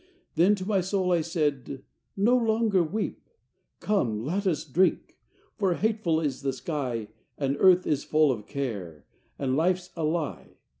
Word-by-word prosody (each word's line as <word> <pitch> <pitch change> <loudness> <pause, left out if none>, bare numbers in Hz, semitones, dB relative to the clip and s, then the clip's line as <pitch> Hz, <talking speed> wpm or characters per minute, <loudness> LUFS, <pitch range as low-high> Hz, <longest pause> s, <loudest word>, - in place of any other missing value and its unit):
XI 365 0 -34
Then 180 +6 +4
to 185 -2 -6
my 195 -2 +1
soul 185 0 0
I 170 -2 +3
said, 145 -5 -2 0.3
"No 225 +6 +4
longer 220 -4 +2
weep. 195 +7 -3 0.5
Come, 115 - 0
let 195 +7 -1
us 155 -4 0
drink; 175 +6 0 0.4
for 190 -4 +2
hateful 210 -7 0
is 145 -5 -2
the 135 -1 -1
sky, 125 -6 -3 0.3
And 140 -1 0
earth 185 -1 +5
is 145 -2 0
full 155 -2 +3
of 105 -4 -5
care, 100 - -5 0.3
and 130 -2 -1
life's 180 +3 0
a 165 - -3
lie. 155 0 -3
165 Hz, 160 wpm, -27 LUFS, 140-190 Hz, 0.5 s, earth